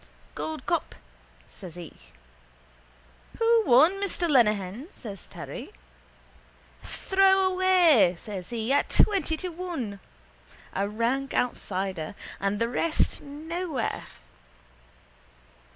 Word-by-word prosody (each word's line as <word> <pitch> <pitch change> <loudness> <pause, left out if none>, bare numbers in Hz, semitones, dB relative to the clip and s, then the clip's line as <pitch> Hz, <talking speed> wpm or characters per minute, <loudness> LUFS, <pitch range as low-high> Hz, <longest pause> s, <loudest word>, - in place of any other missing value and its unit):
—Gold 315 -1 -5
cup, 340 -2 -1 0.5
says 180 -5 -11
he. 175 -3 -9 1.4
—Who 460 -1 +4
won, 270 +8 +7
Mr 370 -3 -1
Lenehan? 215 - +2
says 200 -6 -9
Terry. - - -8 1.1
—Throwaway, 370 - +4
says 190 -2 -7
he, 235 +2 -1
at 285 - +2
twenty 380 -6 +3
to 365 - -4
one. 325 - -5 0.7
A 200 +1 -1
rank 240 +5 -1
outsider. 190 -7 -2 0.2
And 200 +1 0
the 230 +2 +1
rest 310 +7 0
nowhere. 310 -1 -4
270 Hz, 90 wpm, -27 LUFS, -, 1.4 s, won